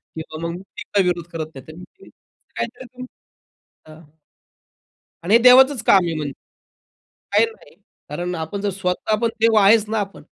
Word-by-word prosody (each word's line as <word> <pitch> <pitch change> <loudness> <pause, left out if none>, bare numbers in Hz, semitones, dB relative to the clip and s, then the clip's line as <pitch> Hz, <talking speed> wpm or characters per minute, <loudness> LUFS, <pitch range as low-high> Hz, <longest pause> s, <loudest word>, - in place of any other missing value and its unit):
किंवा 160 0 -8
मग - - -4
मी 185 +3 -10
काही 195 -2 +3
विरोध 175 -2 -1
करत 160 -1 -4
नाहीत 135 +3 -12
मग 180 - -11
तुम्ही 390 - -18
असं - - -28
काहीतरी 255 - -5
तुम्ही 255 0 -9 0.8
हां. 155 0 -17 1.1
आणि 200 +5 +2
हे - - +8
देवाचच 260 0 +6
काम 190 -3 +5
आहे 165 - -2
म्हणजे 145 -2 -4 1.0
काही - - +4
नाही. 455 +1 -15 0.3
कारण 175 0 -4
आपण 165 +5 -5
जर 205 - -1
स्वतः 190 +3 -2
पण 230 - +2
देव 225 -1 +4
आहेच 210 +2 +5
ना 220 -1 -1
आपण, 200 -1 -6
195 Hz, 175 wpm, -20 LUFS, 165-225 Hz, 1.1 s, हे